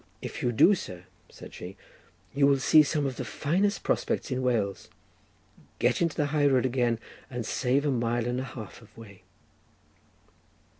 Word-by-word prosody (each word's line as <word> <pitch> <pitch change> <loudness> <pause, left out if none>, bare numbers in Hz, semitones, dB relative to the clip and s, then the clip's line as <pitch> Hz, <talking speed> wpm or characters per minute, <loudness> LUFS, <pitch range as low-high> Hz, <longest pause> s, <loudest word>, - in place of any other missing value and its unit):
"If - - -7
you 120 - +1
do, 150 - +5
sir," 90 - -6 0.3
said - - -12
she, 95 +3 -9 0.6
"you 140 0 +4
will 140 -1 +4
see 155 +3 +6
some 150 0 0
of 130 -2 -3
the - - -3
finest 195 +7 -1
prospects - - -1
in 130 0 -1
Wales, 115 -6 -1 0.9
get - - +1
into 165 -2 +1
the 150 - +2
high 145 -2 +3
road 130 -2 +3
again, 120 -2 +1 0.3
and 120 -3 -5
save 135 +5 0
a 145 - +2
mile 120 -1 0
and 125 +1 -1
a - - -3
half 120 -5 -9
of 115 - -20
way." 100 -4 -13
130 Hz, 170 wpm, -28 LUFS, 115-145 Hz, 0.9 s, see